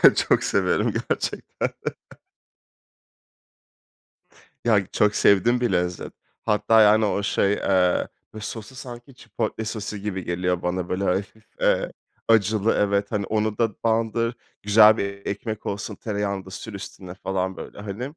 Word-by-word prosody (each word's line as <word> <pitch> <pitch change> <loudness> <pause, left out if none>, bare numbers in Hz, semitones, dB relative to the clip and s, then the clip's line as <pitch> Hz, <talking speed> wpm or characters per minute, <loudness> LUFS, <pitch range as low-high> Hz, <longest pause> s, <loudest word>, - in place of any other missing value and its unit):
Çok - - +2
severim - - +1
gerçekten. - - -2 3.0
Ya, 105 -4 +4
çok 105 0 +2
sevdiğim 120 +5 +4
bir 120 -4 +1
lezzet. 90 -1 -1 0.3
Hatta 110 +1 +4
yani 110 +1 +6
o 100 0 0
şey, 100 0 +2
eee, 90 -3 +2 0.3
böyle 110 - -8
sosu 110 +2 -7
sanki 125 0 -10
chipotle 110 -1 -4
sosu 105 -1 -4
gibi 100 -2 -4
geliyor 90 0 -1
bana 90 0 -2
böyle 95 +2 -1
hafif, 100 +4 -2 0.2
eee, - - +2 0.4
acılı, 110 -1 +3
evet 100 0 +1
hani, 105 -2 -1
onu 110 +1 -1
da 115 -1 +2
bandır, 115 +1 +1 0.3
güzel 105 +1 +7
bir 100 -1 -4
ekmek 110 +1 -4
olsun, 100 +1 -4
tereyağını 100 -3 -3
da - - -10
sür 105 +3 -8
üstüne 95 -2 -8
falan 95 0 -2
böyle - - -9
hani. 105 +3 -5
105 Hz, 135 wpm, -24 LUFS, 95-110 Hz, 3.0 s, güzel